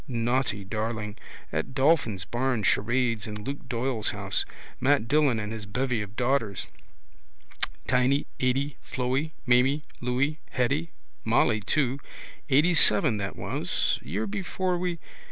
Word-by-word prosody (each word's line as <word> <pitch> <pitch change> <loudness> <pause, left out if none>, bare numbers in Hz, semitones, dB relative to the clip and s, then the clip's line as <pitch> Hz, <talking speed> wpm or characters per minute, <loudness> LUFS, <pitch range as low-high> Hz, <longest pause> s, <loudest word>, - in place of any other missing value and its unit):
Naughty 120 -4 0
darling. 105 +1 -3 0.4
At 130 - -3
Dolphin's 130 - +2
barn 120 -2 -1
charades 115 +1 +1
in 105 -1 -6
Luke 140 +1 -6
Doyle's 120 -2 0
house. 100 0 0 0.3
Mat 135 -4 +2
Dillon 140 -4 +3
and 105 0 -4
his 110 -2 -6
bevy 125 +1 -1
of 105 +1 -8
daughters: 120 -5 0 1.2
Tiny, 125 +3 +2
Atty, 135 +2 0
Floey, 130 +5 -2
Maimy, 130 +5 +4 0.2
Louy, 130 +5 0
Hetty. 140 +6 0 0.3
Molly 110 -1 +3
too. 135 +4 0 0.5
Eightyseven 150 -4 +6
that 100 -1 -4
was. - - 0
Year 95 +10 -3
before 180 - -2
we. 180 -1 -2
125 Hz, 120 wpm, -27 LUFS, 110-140 Hz, 1.2 s, Eightyseven